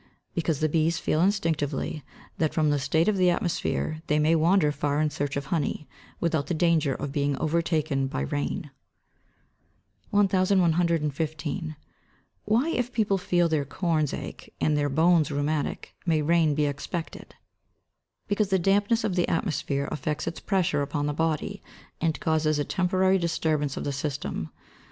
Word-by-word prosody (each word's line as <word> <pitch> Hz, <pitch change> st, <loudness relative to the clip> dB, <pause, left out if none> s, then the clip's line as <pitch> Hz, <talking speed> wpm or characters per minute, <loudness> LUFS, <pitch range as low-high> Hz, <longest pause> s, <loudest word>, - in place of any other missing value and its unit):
_ -, -, -32 dB, 0.3 s
Because 165 Hz, -3 st, -1 dB
the 155 Hz, -, +3 dB
bees 160 Hz, +2 st, +1 dB
feel 155 Hz, -, 0 dB
instinctively 160 Hz, -6 st, 0 dB, 0.4 s
that 155 Hz, -2 st, 0 dB
from 155 Hz, -2 st, +3 dB
the 145 Hz, -, +1 dB
state 160 Hz, +5 st, +1 dB
of 210 Hz, -2 st, +2 dB
the 180 Hz, -1 st, +4 dB
atmosphere 165 Hz, -2 st, -1 dB
they 150 Hz, -, +2 dB
may 155 Hz, +2 st, +3 dB
wander 165 Hz, 0 st, +4 dB
far 145 Hz, 0 st, -1 dB
in 155 Hz, -1 st, +1 dB
search 145 Hz, -2 st, -2 dB
of 140 Hz, -, -3 dB
honey, 155 Hz, -1 st, -1 dB, 0.3 s
without 160 Hz, -4 st, 0 dB
the 175 Hz, -, -1 dB
danger 160 Hz, -5 st, +2 dB
of 145 Hz, -1 st, -4 dB
being 140 Hz, -1 st, 0 dB
overtaken 155 Hz, -4 st, 0 dB
by 100 Hz, -, -3 dB
rain. 70 Hz, +2 st, -3 dB, 1.4 s
1115. 170 Hz, -5 st, +1 dB, 0.7 s
Why 230 Hz, +9 st, +2 dB
if 245 Hz, -4 st, -1 dB
people 205 Hz, -5 st, +1 dB
feel 175 Hz, -2 st, +2 dB
their 155 Hz, -3 st, +1 dB
corns 155 Hz, 0 st, 0 dB
ache, -, -, -7 dB
and 155 Hz, -, +2 dB
their 145 Hz, -1 st, +1 dB
bones 160 Hz, +2 st, +3 dB
rheumatic, 145 Hz, +1 st, -2 dB
may 160 Hz, -3 st, +1 dB
rain 160 Hz, -1 st, +3 dB
be 150 Hz, 0 st, +2 dB
expected? 145 Hz, +4 st, -5 dB, 0.9 s
Because 205 Hz, -1 st, +1 dB
the 190 Hz, -, +3 dB
dampness 200 Hz, +5 st, +2 dB
of 200 Hz, -, 0 dB
the 175 Hz, -, +2 dB
atmosphere 145 Hz, -5 st, -1 dB
affects 150 Hz, +1 st, -2 dB
its 165 Hz, -, -4 dB
pressure 180 Hz, -7 st, +1 dB
upon 145 Hz, +1 st, -2 dB
the 150 Hz, -, -1 dB
body, 160 Hz, 0 st, -1 dB, 0.4 s
and 160 Hz, -1 st, 0 dB
causes 155 Hz, -1 st, +1 dB
a 145 Hz, -, 0 dB
temporary 185 Hz, +1 st, +2 dB
disturbance 155 Hz, -4 st, 0 dB
of -, -, -3 dB
the 140 Hz, -, -2 dB
system. 135 Hz, -, -3 dB
155 Hz, 155 wpm, -26 LUFS, 145-175 Hz, 1.4 s, the